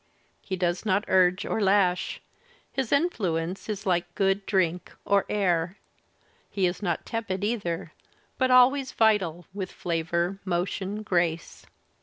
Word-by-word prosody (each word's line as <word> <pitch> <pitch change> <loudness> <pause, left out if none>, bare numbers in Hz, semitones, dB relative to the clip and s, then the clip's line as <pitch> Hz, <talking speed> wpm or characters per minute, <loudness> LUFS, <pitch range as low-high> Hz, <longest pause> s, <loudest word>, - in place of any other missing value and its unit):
He 190 - -4
does 175 -1 -1
not 200 -1 +1
urge 185 0 +3
or 220 - -1
lash. 195 -2 +2 0.5
Hil^ihfluence 220 - -1
is 210 0 -4
like 175 -2 0
good 195 0 +1
drink 180 -3 0
or 200 -1 +2
air. 180 -2 0 0.7
He 195 -2 0
is 175 +2 -1
not 175 -5 -2
tepid 205 -4 -3
either, 205 -7 -2 0.5
but 260 -1 +3
always 255 +2 +5
vital, 190 -7 +2
with 190 -2 -5
flavour, 170 +2 -2
motion, 190 +3 -2
grace. 170 -4 -1
190 Hz, 125 wpm, -26 LUFS, 175-210 Hz, 0.7 s, always